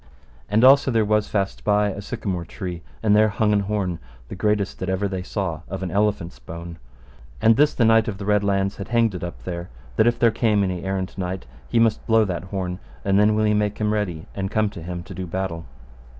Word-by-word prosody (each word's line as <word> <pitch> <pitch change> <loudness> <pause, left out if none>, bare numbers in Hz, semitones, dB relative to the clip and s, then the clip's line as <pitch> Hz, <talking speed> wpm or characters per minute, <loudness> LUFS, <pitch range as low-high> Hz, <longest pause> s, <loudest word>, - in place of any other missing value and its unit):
And 110 +3 +3
also 135 +1 +7
there 115 -3 +2
was 105 0 +2
fast 100 -2 -2
by 105 0 +3
a 100 +1 -5
sycamore 100 -5 -3
tree, 90 0 -6 0.2
and 105 -1 +4
there 110 +1 +5
hung 105 +1 +1
an 105 - +3
horn, 100 -4 -2 0.3
the - - -6
greatest 105 0 0
that 95 - -3
ever 95 +2 0
they 95 -2 -3
saw, 90 -5 -3
of 95 0 -4
an 90 - -3
elephant's 100 -9 0
bone; 85 +5 -9 0.6
and 115 0 +5
this 150 +4 +3
Knight 115 -1 +4
of 105 -3 -3
the 100 - -6
Red 105 0 +3
Launds 100 0 0
had 100 - -6
hanged 115 -3 +2
it 90 - -6
up 85 - -7
there, 85 -1 -5 0.3
that 110 - +5
if 120 0 +2
there 115 -1 +4
came 105 -3 +2
any 90 -2 -2
errant 95 0 -3
knight, 90 -2 -3 0.2
he - - 0
must 115 -1 +3
blow 110 -1 +4
that 90 -2 -4
horn, 95 -1 -4 0.3
and 100 0 +3
then 105 +1 +4
will 110 - +2
he 105 - +3
make 105 0 0
him 105 0 0
ready 90 -7 -2
and 95 -1 -3
come 110 -1 +1
to 85 - -9
him 85 +1 -5
to 95 - -10
do 90 0 -5
battle. 85 -2 -3
100 Hz, 230 wpm, -23 LUFS, 90-105 Hz, 0.6 s, also